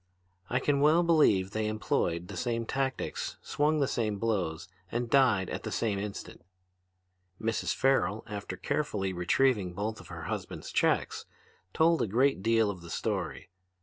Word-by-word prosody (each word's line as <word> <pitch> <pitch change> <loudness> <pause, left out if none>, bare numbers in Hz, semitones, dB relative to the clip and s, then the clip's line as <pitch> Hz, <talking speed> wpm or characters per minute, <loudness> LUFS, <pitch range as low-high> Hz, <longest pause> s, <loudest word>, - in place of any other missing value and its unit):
I 125 - +1
can 140 +1 +1
well 155 +4 +5
believe 125 - +4
they 110 0 -1
employed 90 -5 -1
the - - -8
same 115 -2 -1
tactics, 135 +2 -2
swung 150 +1 +1
the 140 - +2
same 110 -5 -1
blows, 95 -8 -1 0.2
and 120 0 -2
died 120 -9 +4
at - - -3
the - - -5
same 105 -4 0
instant. 100 0 -6 1.0
"Mrs. 115 0 -1
Farrel, 110 -7 +2
after 105 -2 -6
carefully 100 -10 -1
retrieving 90 +2 +2
both 110 +3 -3
of - - -12
her - - -8
husbands' - - -5
checks, - - +1 0.4
told 165 - +3
a - - +1
great 125 +2 +2
deal 115 0 +3
of 90 -3 -10
the 85 - -11
story. - - -3
110 Hz, 155 wpm, -30 LUFS, 100-135 Hz, 1.0 s, well